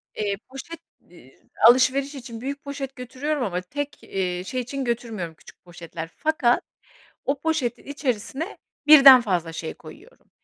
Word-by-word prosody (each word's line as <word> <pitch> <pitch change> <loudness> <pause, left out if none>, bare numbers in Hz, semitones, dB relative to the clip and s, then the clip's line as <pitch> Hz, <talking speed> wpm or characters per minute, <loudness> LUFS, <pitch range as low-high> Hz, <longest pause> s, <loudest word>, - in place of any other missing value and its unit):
Eee, 200 -2 -1
poşet, 270 +6 -9 0.3
eee, 135 -7 -19 0.3
alışverişi 265 +3 +4
için 235 -3 -9
büyük 280 +2 -5
poşet 275 -1 -6
götürüyorum 260 +3 -3
ama 180 -5 -2
tek, 290 +10 -6
eee, 180 -2 -3
şey 255 +5 -2
için 265 +2 -4
götürmüyorum 225 -8 -3
küçük - - -18
poşetler. 170 -2 -8
Fakat 300 -6 +2 0.6
o 275 0 -1
poşetin 295 -7 -1
içerisine 280 - -3 0.3
birden 275 -4 +10
fazla 180 -7 -1
şey 160 0 -5
koyuyorum. 385 - -16
250 Hz, 140 wpm, -24 LUFS, 190-280 Hz, 0.6 s, birden